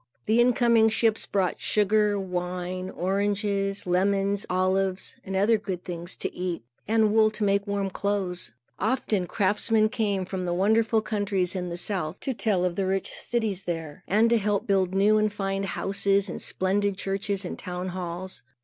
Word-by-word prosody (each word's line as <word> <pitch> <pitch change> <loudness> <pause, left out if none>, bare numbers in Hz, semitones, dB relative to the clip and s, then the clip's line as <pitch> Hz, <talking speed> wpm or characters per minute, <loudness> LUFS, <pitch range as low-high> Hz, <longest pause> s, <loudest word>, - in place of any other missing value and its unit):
The 220 +2 +3
incoming 235 -2 +4
ships 220 0 +1
brought 190 -3 0
sugar, 210 0 +2
wine, 180 0 -3
oranges, 200 +1 -1
lemons, 195 +2 +1
olives 185 +1 0
and 195 - -5
other 210 +3 +3
good 190 -4 -5
things 175 0 -5
to - - -4
eat, 180 -6 -3 0.2
and 220 -1 +3
wool 220 -1 +5
to 215 0 -4
make 200 0 +1
warm 200 -1 -1
clothes. 185 - -2 0.3
Often 215 -4 0
craftsmen 215 +3 +2
came 205 -5 -1
from 185 0 -4
the 175 0 -1
wonderful 220 +3 +2
countries 200 -4 -1
in 180 -1 -3
the 170 - -5
south 175 -2 -2
to 265 - -2
tell 205 -6 +1
of 175 -1 -1
the 195 -1 0
rich 190 0 -1
cities 215 -6 -2
there, 165 -4 -5
and 220 +4 +3
help 210 -3 +2
to - - -21
build 190 -1 +2
new 210 +2 +4
and 215 0 +1
fine 195 -1 -2
houses, 195 0 +1
and - - -5
splendid 195 +1 0
churches, 195 0 -2
and - - -6
town 180 0 -4
halls. 180 +1 -6
195 Hz, 165 wpm, -26 LUFS, 185-210 Hz, 0.3 s, wool